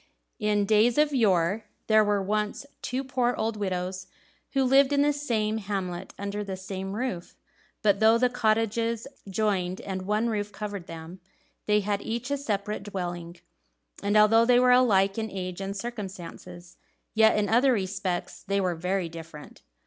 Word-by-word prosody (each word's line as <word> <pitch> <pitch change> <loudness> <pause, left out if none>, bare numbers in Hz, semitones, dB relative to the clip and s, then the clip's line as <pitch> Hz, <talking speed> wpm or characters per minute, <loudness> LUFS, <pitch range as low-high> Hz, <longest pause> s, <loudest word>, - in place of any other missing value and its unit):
In 210 -2 +1
days 220 +3 +3
of 300 -1 +3
yore, 200 -3 +2 0.2
there 215 -1 +5
were 205 -1 +1
once 210 +6 -2 0.2
two 255 +2 -2
poor 250 -2 0
old 225 0 -1
widows 185 -2 -3 0.5
who 270 -1 +3
lived 270 +2 +5
in 285 0 +3
the 295 0 +3
same 220 -6 -1
hamlet 195 -4 -4
and 200 - -5
under 210 0 -2
the 195 -2 -5
same 195 0 -5
roof. 210 -6 -4 0.5
But 200 -2 +3
though 220 +1 +6
the 250 +1 +3
cottages 225 -1 0 0.2
joined 190 -3 0
and 190 -1 -4
one 210 +4 0
roof 210 -2 -2
covered 200 -3 -6
them, 165 +2 -9 0.5
they 210 0 +3
had 200 0 -1
each 235 +6 -4
a 285 - +1
separate 210 -6 -2
dwelling; 175 -3 -5 0.6
and 205 +1 +2
although 220 +2 +6
they 245 +1 +5
were 250 0 +5
alike 205 -5 +4
in 220 0 -3
age 185 -1 -5
and 195 +1 -4
circumstances, 185 -5 -8 0.4
yet 220 0 +5
in 210 -1 +1
other 245 +5 +4
respects 190 -4 -2
they 200 +1 0
were 185 -2 +1
very 180 +2 -1
different. 165 -2 -11
205 Hz, 165 wpm, -27 LUFS, 190-230 Hz, 0.6 s, though